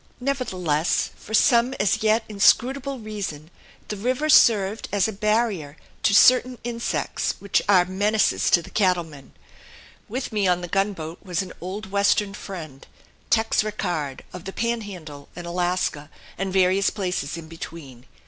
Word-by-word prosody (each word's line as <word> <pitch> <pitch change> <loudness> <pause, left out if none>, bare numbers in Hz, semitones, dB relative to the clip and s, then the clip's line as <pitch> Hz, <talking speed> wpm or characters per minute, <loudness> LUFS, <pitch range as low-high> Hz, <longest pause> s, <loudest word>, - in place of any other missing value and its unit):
Nevertheless 185 - 0
for 220 - -4
some 240 +2 +4
as 210 +3 +1
yet 220 +1 +3
inscrutable 260 +6 +2
reason 200 -9 -6 0.4
the 210 - -3
river 255 +8 -1
served 215 -7 +4
as 205 -1 +2
a 220 - -4
barrier 210 -7 0 0.2
to 200 - +3
certain 250 +2 +5
insects 235 0 -2
which 200 -1 0
are 185 -3 +6
menaces 205 +4 +1
to 170 - +4
the - - -12
cattlemen. 170 -8 -1 0.8
With 250 +4 -4
me 205 -3 +1
on 180 -1 +2
the 175 - -5
gunboat 180 -3 -2
was 180 -2 -2
an 185 - -10
old 190 +3 -6
Western 200 0 +2
friend, 160 -10 -9 0.4
Tex 225 -1 +2
Rickard, 175 -10 -3
of 180 -1 -9
the 195 - -6
Panhandle 195 -11 -4
and 175 0 -7
Alaska 175 -4 -1 0.3
and 195 0 -3
various 190 +1 +3
places 180 -7 -3
in 165 -1 -9
between. 150 -6 -10
195 Hz, 145 wpm, -24 LUFS, 170-220 Hz, 0.8 s, are